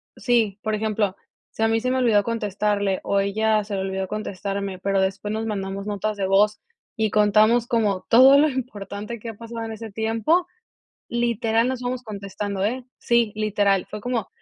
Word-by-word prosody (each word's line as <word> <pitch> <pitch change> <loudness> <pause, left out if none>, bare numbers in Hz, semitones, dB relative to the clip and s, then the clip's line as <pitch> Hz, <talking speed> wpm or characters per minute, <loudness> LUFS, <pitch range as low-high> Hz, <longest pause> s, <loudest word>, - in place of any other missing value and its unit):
sí, 225 -5 +1
por 215 - -1
ejemplo, 210 -2 -1 0.4
si 220 - -3
a - - +4
mí 225 0 +2
se 255 +2 -1
me 260 - +1
olvidó 225 -5 +3
contestarle, 205 -3 -1
o 200 - +1
ella 215 +2 +1
se 205 0 -5
le 190 - -1
olvidó 190 0 -3
contestarme, 200 -2 -4
pero, 195 +1 0
después 190 +2 -1
nos 220 +1 -2
mandamos 195 -2 -4
notas 210 0 -2
de 195 - -1
voz 210 +2 +3 0.4
y 220 -2 0
contamos 215 +3 +4
como 210 -6 0
todo 265 +4 +8
lo 305 +1 +4
importante 220 -4 -5
que 230 - -7
ha 225 - -6
pasado 230 +1 -7
en 225 - -5
ese 220 0 -8
tiempo. 225 - +1 0.6
Literal, 235 -1 +1
nos 260 -1 -3
vamos 250 0 -3
contestando, 200 -2 -4
¿eh? 250 +4 -2
Sí, 235 -3 +2
literal. 205 -3 +1
Fue 210 - -6
como, 235 -4 -2
215 Hz, 185 wpm, -23 LUFS, 200-230 Hz, 0.6 s, todo